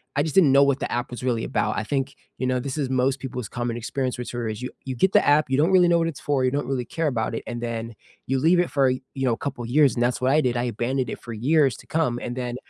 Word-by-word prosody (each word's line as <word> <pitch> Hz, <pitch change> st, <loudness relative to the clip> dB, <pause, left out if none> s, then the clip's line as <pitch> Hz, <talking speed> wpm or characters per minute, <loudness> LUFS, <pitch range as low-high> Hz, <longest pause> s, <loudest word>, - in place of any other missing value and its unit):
I 145 Hz, -, +2 dB
just 155 Hz, -, -4 dB
didn't 165 Hz, -8 st, +6 dB
know 140 Hz, +1 st, +7 dB
what 140 Hz, -1 st, +2 dB
the -, -, -3 dB
app 120 Hz, 0 st, -2 dB
was 120 Hz, -, -7 dB
really 120 Hz, -3 st, 0 dB
about, -, -, -1 dB
I 110 Hz, -, -1 dB
think, 135 Hz, +2 st, -2 dB, 0.2 s
you 130 Hz, -, -2 dB
know, 130 Hz, 0 st, +1 dB
this 135 Hz, +2 st, -4 dB
is 140 Hz, -4 st, -1 dB
most 130 Hz, +1 st, +1 dB
people's 125 Hz, -5 st, -5 dB
common 120 Hz, -1 st, -3 dB
experience 130 Hz, +2 st, -3 dB
with 125 Hz, -, -5 dB
Twitter, 120 Hz, -2 st, -3 dB
is 110 Hz, +3 st, -5 dB
you 125 Hz, -, -4 dB, 0.2 s
you 130 Hz, -1 st, -4 dB
get 190 Hz, +10 st, +2 dB
the -, -, +5 dB
app, 145 Hz, -1 st, +4 dB
you 135 Hz, -, +1 dB
don't 160 Hz, +6 st, +3 dB
really 180 Hz, -2 st, +6 dB
know 170 Hz, -, +4 dB
what 165 Hz, -, +1 dB
it's 160 Hz, -, -5 dB
for, 135 Hz, -3 st, +1 dB
you 130 Hz, -, +2 dB
don't 140 Hz, -2 st, -2 dB
really 130 Hz, -3 st, -2 dB
care 165 Hz, +4 st, -2 dB
about 115 Hz, -4 st, -1 dB
it, -, -, -4 dB
and 120 Hz, 0 st, -5 dB
then 115 Hz, -1 st, -4 dB, 0.3 s
you 135 Hz, +1 st, +1 dB
leave 170 Hz, +5 st, +4 dB
it 175 Hz, -, +1 dB
for, 135 Hz, -2 st, +3 dB
you 130 Hz, 0 st, -3 dB, 0.3 s
know, 120 Hz, -, +3 dB
a -, -, -3 dB
couple 130 Hz, -4 st, -5 dB
years, 135 Hz, +3 st, +3 dB
and 120 Hz, -, +1 dB
that's 125 Hz, +1 st, 0 dB
what 130 Hz, -, +2 dB
I 150 Hz, -, +4 dB
did, 125 Hz, -4 st, 0 dB
I 120 Hz, -, 0 dB
abandoned 120 Hz, +2 st, -2 dB
it -, -, -5 dB
for 120 Hz, -, -7 dB
years 135 Hz, +3 st, +2 dB
to -, -, -15 dB
come, 140 Hz, -7 st, 0 dB
and 120 Hz, -, -4 dB
then 125 Hz, -1 st, -3 dB
130 Hz, 310 wpm, -24 LUFS, 120-145 Hz, 0.3 s, know